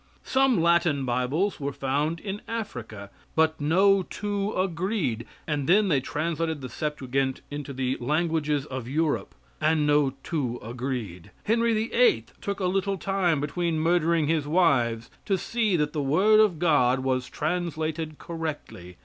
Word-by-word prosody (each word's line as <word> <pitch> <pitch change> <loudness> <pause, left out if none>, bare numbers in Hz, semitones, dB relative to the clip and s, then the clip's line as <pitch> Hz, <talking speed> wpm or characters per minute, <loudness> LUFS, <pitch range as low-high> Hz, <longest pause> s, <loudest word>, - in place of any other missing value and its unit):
Some 265 -5 +3
Latin 170 -4 +2
Bibles 130 +12 0
were 140 0 -2
found 145 +5 -1
in 200 +1 -5
Africa 115 - -6 0.2
but 160 -1 +2
no 190 +6 +4
two 205 +2 -3
agreed; 180 - -1 0.2
and 150 -2 -2
then 200 +2 +5
they 145 -5 +3
translated 160 +2 -2
the 130 - -6
Septuagint 135 -3 -2
into 145 -1 -5
the 130 -1 -1
languages 150 +1 0
of 130 -5 -6
Europe, 155 +3 -1 0.3
and 155 -1 +2
no 145 -2 +3
two 130 -8 -2
agreed. 120 -7 -5
Henry 230 +1 +2
VIII. 220 - +3 0.2
took 200 -1 -3
a 190 - -1
little 195 +1 0
time 185 -5 +1
between 160 +3 -1
murdering 165 -1 +2
his 155 -1 0
wives 125 -9 +2
to 195 -2 +1
see 220 0 0
that 150 -2 0
the 150 - -1
Word 190 +11 +4
of 210 -6 +4
God 135 -6 +3
was 130 -1 -1
translated 160 -1 -2
correctly. 150 - -6
155 Hz, 145 wpm, -26 LUFS, 135-180 Hz, 0.3 s, then